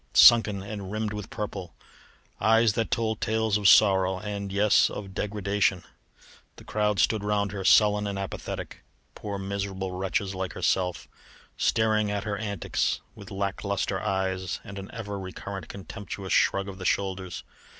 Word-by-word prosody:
sunken 105 -4 +7
and 100 -2 -6
rimmed 110 0 -2
with 105 -2 -6
purple; 95 -5 -5 0.6
eyes 115 0 +4
that 115 0 -1
told 110 -2 -1
tales 110 -1 +1
of 105 -2 +5
sorrow 95 -2 +5
and, 100 -1 -5
yes! 105 +1 +4
of 95 -2 -7
degradation. 100 -2 0 0.7
The - - -13
crowd 105 -1 0
stood 110 -2 +2
round 105 -1 0
her, 100 -1 -5
sullen 105 +1 +5
and 100 -1 -3
apathetic; 100 -1 -5 0.3
poor, 100 -1 -5
miserable 95 -1 -3
wretches 95 +1 -2
like 95 -1 -4
herself, 90 -2 0 0.5
staring 110 -2 +2
at 100 0 -2
her 105 -2 -2
antics 100 -3 -1
with - - -12
lack 100 0 -3
lustre 100 -1 -1
eyes 95 -3 -1
and 100 0 -8
an 95 - -8
ever 105 -4 -5
recurrent 95 0 -7
contemptuous 100 +1 -6
shrug 100 0 +3
of 95 -1 -8
the 90 - -6
shoulders. 95 -2 -1
100 Hz, 150 wpm, -27 LUFS, 95-105 Hz, 0.7 s, sunken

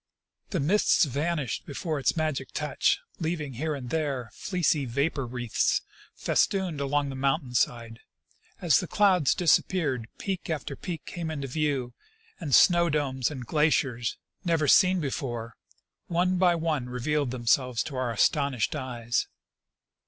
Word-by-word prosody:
The 185 - -1
mists 175 +5 +3
vanished 145 -1 -2
before 155 +1 -3
its 135 - +1
magic 155 -3 -2
touch, - - +1 0.2
leaving 160 -4 -3
here 150 +5 -2
and 125 -3 -7
there 140 -8 -2
fleecy 170 -7 0
vaj)or 140 0 -1
wreaths 120 -3 0 0.3
festooned 185 -7 0
along 140 0 0
the 135 - -5
mountain 135 0 0
side; 115 -1 -1 0.6
as 165 -6 +4
the 180 - -4
clouds 185 -8 +3
disappeared, 155 -7 +1
peak 190 -3 -4
after 150 -3 -3
peak 170 +1 -6
came 170 -2 -5
into 140 -3 -4
view, 135 -3 -1 0.5
and 150 -7 +2
snow 170 -1 +5
domes 135 -5 0
and 130 -5 -7
glaciers, 135 -5 +1 0.3
never 165 -4 +1
seen 185 +2 +5
before, 120 -5 -4 0.5
one 180 +2 +1
by 180 -2 +4
one 155 -6 -1
revealed 140 +3 -1
themselves 125 0 +1
to 145 - -7
our 130 -1 -1
astonished 135 +2 +1
eyes. 120 -4 -2
145 Hz, 135 wpm, -27 LUFS, 125-165 Hz, 0.6 s, snow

